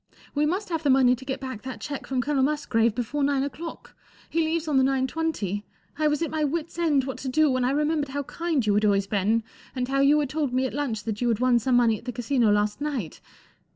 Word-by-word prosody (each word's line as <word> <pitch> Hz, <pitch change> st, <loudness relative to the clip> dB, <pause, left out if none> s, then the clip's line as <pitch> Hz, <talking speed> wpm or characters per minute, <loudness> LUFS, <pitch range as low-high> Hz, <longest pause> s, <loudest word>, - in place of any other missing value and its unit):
We 300 Hz, +1 st, +2 dB
must 375 Hz, +5 st, -2 dB
have 325 Hz, -2 st, -1 dB
the 290 Hz, -, +1 dB
money 260 Hz, -1 st, +5 dB
to 265 Hz, -, -12 dB
get 265 Hz, 0 st, -3 dB
back 260 Hz, -5 st, -6 dB
that 260 Hz, -1 st, -7 dB
cheque 285 Hz, -2 st, -6 dB
from 260 Hz, -2 st, 0 dB
Colonel 280 Hz, +1 st, 0 dB
Musgrave 235 Hz, -6 st, +1 dB
before 265 Hz, +4 st, -2 dB
nine 275 Hz, -1 st, +2 dB
o'clock—he 325 Hz, +2 st, -7 dB
leaves 320 Hz, 0 st, 0 dB
on 295 Hz, -3 st, +2 dB
the 265 Hz, -, +5 dB
nine 265 Hz, 0 st, +2 dB
twenty. 260 Hz, -, -2 dB, 0.4 s
I 305 Hz, -, +3 dB
was 300 Hz, +2 st, +1 dB
at 330 Hz, -, -3 dB
my 310 Hz, -1 st, -1 dB
wits' 325 Hz, +3 st, -2 dB
end 300 Hz, -5 st, +3 dB
what 265 Hz, 0 st, -5 dB
to 265 Hz, -, -4 dB
do, 305 Hz, +2 st, +3 dB
when 255 Hz, -1 st, +1 dB
I 250 Hz, -, +2 dB
remembered 295 Hz, +1 st, 0 dB
how 285 Hz, +1 st, -3 dB
kind 320 Hz, -4 st, -1 dB
you 210 Hz, -, +2 dB
had 210 Hz, +1 st, +2 dB
always 200 Hz, -2 st, +3 dB
been 210 Hz, +3 st, +1 dB, 0.3 s
and 250 Hz, -1 st, -1 dB
how 275 Hz, 0 st, +1 dB
you 285 Hz, +2 st, +5 dB
had 290 Hz, -3 st, -1 dB
told 295 Hz, -4 st, -1 dB
me 260 Hz, +1 st, +1 dB
at 260 Hz, -, -3 dB
lunch 250 Hz, -7 st, -2 dB
that 220 Hz, -1 st, -4 dB
you 245 Hz, -, +1 dB
had 225 Hz, -2 st, +1 dB
won 250 Hz, -1 st, +4 dB
some 250 Hz, +2 st, +1 dB
money 230 Hz, -3 st, +3 dB
at -, -, -19 dB
the 250 Hz, -, -3 dB
Casino 245 Hz, -2 st, +1 dB
last 210 Hz, +4 st, +1 dB
night. 270 Hz, -, -3 dB
265 Hz, 255 wpm, -25 LUFS, 240-300 Hz, 0.4 s, money